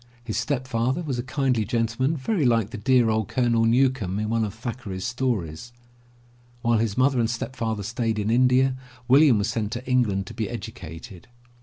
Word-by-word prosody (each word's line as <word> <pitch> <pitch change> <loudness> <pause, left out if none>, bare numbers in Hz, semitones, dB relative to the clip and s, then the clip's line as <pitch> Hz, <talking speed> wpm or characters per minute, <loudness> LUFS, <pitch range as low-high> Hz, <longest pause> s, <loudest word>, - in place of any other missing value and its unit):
His 115 -3 -4
step 130 -3 -1
father 130 +6 0
was 135 -6 -3
a - - -2
kindly 130 -4 0
gentleman 115 - 0
very 165 +5 -1
like 115 -5 +2
the - - -5
dear 125 -1 +3
old 110 -2 0
Colonel 120 -2 +1
Newcome 120 -5 +2
in 105 0 -2
one 115 -1 +1
of 105 - -2
Thackeray's 115 -4 -6
stories. 120 -6 -3 0.9
While 115 -1 +3
his 110 -1 -1
mother 130 0 +3
and 115 -1 +1
stepfather 115 -2 -3
stayed 115 +1 -2
in 105 +1 0
India, 130 +2 +3 0.3
William 135 -2 +6
was 105 +3 0
sent 110 -3 -2
to 120 +2 -5
England 110 -7 +1
to - - -9
be - - -3
educated. 80 +3 -9
120 Hz, 180 wpm, -24 LUFS, 110-130 Hz, 0.9 s, William